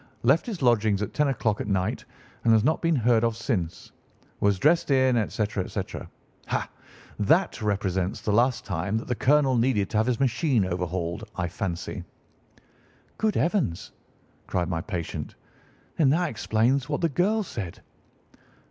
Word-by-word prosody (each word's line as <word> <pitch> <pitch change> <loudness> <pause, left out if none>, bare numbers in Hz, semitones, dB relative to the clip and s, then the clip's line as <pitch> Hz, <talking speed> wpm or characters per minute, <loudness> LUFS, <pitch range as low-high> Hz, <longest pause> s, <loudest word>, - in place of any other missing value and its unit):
Left 135 - +3
his 200 - -4
lodgings 110 -4 +3
at 105 - -5
ten 150 -1 +2
o'clock 110 -5 0
at - - -4
night, 100 +4 -1 0.4
and 115 - +4
has 110 -1 +4
not 155 +5 +1
been 165 -1 +2
heard 120 -2 +3
of 115 -1 0
since. 100 - -3 0.5
Was 100 -1 +2
dressed 155 - +3
in,' 130 -2 +4
etc., 105 -2 -1
etc. - - -5 0.4
Ha! - - -1 0.5
That 155 - +2
represents 95 -3 -1
the 105 - -1
last 120 +3 +2
time 100 +2 -1
that 115 - -5
the 125 - 0
colonel 135 +2 +3
needed 115 -5 +1
to - - 0
have 110 +2 +2
his 125 -1 0
machine 135 - +2
overhauled, 90 -1 -3
I 90 -1 -1
fancy." 85 0 -4 1.2
"Good 215 -2 +1
heavens!" 165 - 0 0.6
cried 90 -1 -1
my 80 -2 -1
patient. 90 -5 -5 0.6
"Then 150 -5 +4
that 165 +3 +2
explains 120 +5 +1
what 145 - -1
the 170 - +3
girl 205 +8 +1
said." 100 - -6
115 Hz, 155 wpm, -26 LUFS, 100-140 Hz, 1.2 s, and